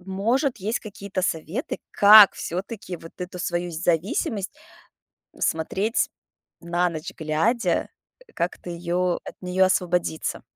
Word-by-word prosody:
может 225 +8 0
есть 210 +4 -1
какие-то 200 -3 -5
советы, 170 - -2
как 205 -1 +9
всё-таки 185 +1 -5
вот 165 0 -12
эту 180 0 -6
свою 175 0 -2
зависимость 180 +5 -1 0.8
смотреть 195 +7 0 0.5
на 175 +1 0
ночь 155 -1 -6
глядя, 165 +10 0 0.4
э, - - -21
как-то 175 +1 -3
её 175 +1 -1
от - - -8
неё 185 +1 +3
освободиться? 180 -3 -1
180 Hz, 115 wpm, -24 LUFS, 170-200 Hz, 0.8 s, как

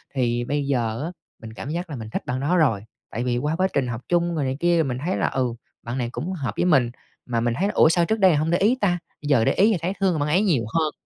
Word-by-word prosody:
thì 120 -2 0
bây 145 +1 -1
giờ 120 -2 -1
á, 170 - -4 0.3
mình 110 0 -9
cảm 135 - -7
giác 170 +2 -3
là 145 - -5
mình 110 -2 -7
thích - - -4
bạn 125 +1 -2
đó 165 +6 +1
rồi, 120 -11 +2 0.3
tại 120 +3 -3
vì 120 -1 0
qua 150 +5 -1
quá 185 +2 +2
trình 135 -3 +1
học 120 0 -4
chung 175 -1 +1
rồi 150 - -1
này 130 +1 -2
kia 175 0 +3
thì 165 - +3
mình 125 -3 -3
thấy 185 - 0
là: - - +1
"Ừ, 125 -3 -1 0.3
bạn 120 +3 -4
này 120 -2 -2
cũng 185 +7 -4
hợp 130 - -3
với - - +1
mình." 130 -9 +3 0.3
Mà 115 -2 -1
mình 120 0 0
thấy 200 - +2
là: - - -2
"Ủa, 160 - +6
sao 170 0 +3
trước 220 +3 -1
đây 185 -5 +5
hông 155 +2 0
để 175 - +3
ý 220 +6 +3
ta?" 175 -3 +2 0.2
Giờ 140 -6 +2
để - - +3
ý 210 +4 +4
thì 195 - +1
thấy 180 +3 -1
thương 185 -5 +1
bạn 145 +1 0
ấy 180 +6 +3
nhiều 150 - +2
hơn. 160 -2 +1
145 Hz, 305 wpm, -23 LUFS, 120-175 Hz, 0.3 s, Ủa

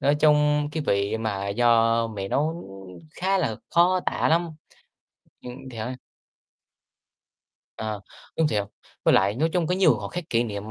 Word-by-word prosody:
nói 145 +1 +3
chung 150 -1 +3
cái 155 - -2
vị 100 +2 +1
mà 100 -3 -3
do 115 +1 +3
mẹ 100 -3 -5
nấu 160 +4 -1 0.5
khá 190 +4 0
là 115 - -1
khó 180 +2 +4
tả - - +1
lắm. 170 +1 +2 0.9
Ừm, 125 - -8 0.2
thì 115 - -9
đấy. 125 +4 -4 1.8
Ờ, 110 -2 -4 0.4
đúng 160 -2 +3
thiệt. 105 -6 0 0.4
Với - - +5
lại, 100 +2 +3
nói 155 +6 +1
chung 175 -3 +1
có 180 - +1
nhiều 185 -8 +4
khoảnh 105 -2 -6
khắc 175 -2 -5
kỷ 115 0 +2
niệm 105 -1 -6
120 Hz, 165 wpm, -25 LUFS, 110-160 Hz, 1.8 s, Với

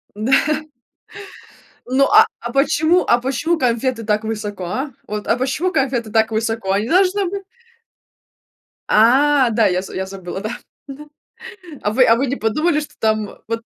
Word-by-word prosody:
Да. 215 +5 -2 1.6
Ну, 265 +2 +3
а, 435 +1 +7
а - - -6
почему, 315 +5 +2
а 240 - +4
почему 270 +7 -1
конфеты 245 -2 -1
так 210 0 0
высоко, 210 -4 -5
а? 265 - -4 0.2
Вот, 210 0 -5
а 230 - +2
почему 275 +8 -1
конфеты 255 - -1
так 220 0 +2
высоко? 225 -2 -2
Они 205 +3 0
должны 380 +3 +2
быть 395 +1 -6 1.5
А, 260 +4 +4
да, 220 0 +3
я 180 0 0
з 190 - -10
я 190 - -2
забыла 190 -1 -7
да. 215 - -4 0.4
Да. 280 +2 -10 0.8
А 210 - 0
вы 255 +3 +4
а 230 - +5
вы 270 +4 0
не 265 - -1
подумали 300 +9 0
что 295 - -9
там 215 -1 0 0.2
вот 230 0 -4
235 Hz, 160 wpm, -19 LUFS, 215-280 Hz, 1.6 s, а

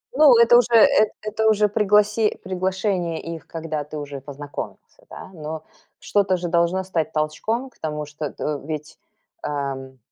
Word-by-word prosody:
Ну, 285 -4 +7
это 235 +1 +7
уже 240 -1 +3
эт 215 -1 +6
это 215 +1 -1
уже 210 -1 +4
пригласи 210 +1 +2
приглашение 185 -2 -1
их, 165 -1 -7
когда 160 -2 -4
ты 150 +1 -8
уже 145 -1 -6
и - - -7
познакомился, 145 +1 -8
да? - - -10
Но 155 -1 -6 0.4
что-то 195 -2 +1
же 175 -1 -4
должно 170 +2 +2
стать 170 -4 -2
толчком 215 +12 -1
к - - -30
тому, 150 -1 -3
что 150 0 -5
т - - -8
э, 150 -1 -1
ведь, 150 0 -6 0.4
ам, 135 -2 -4
170 Hz, 165 wpm, -23 LUFS, 150-210 Hz, 0.4 s, Ну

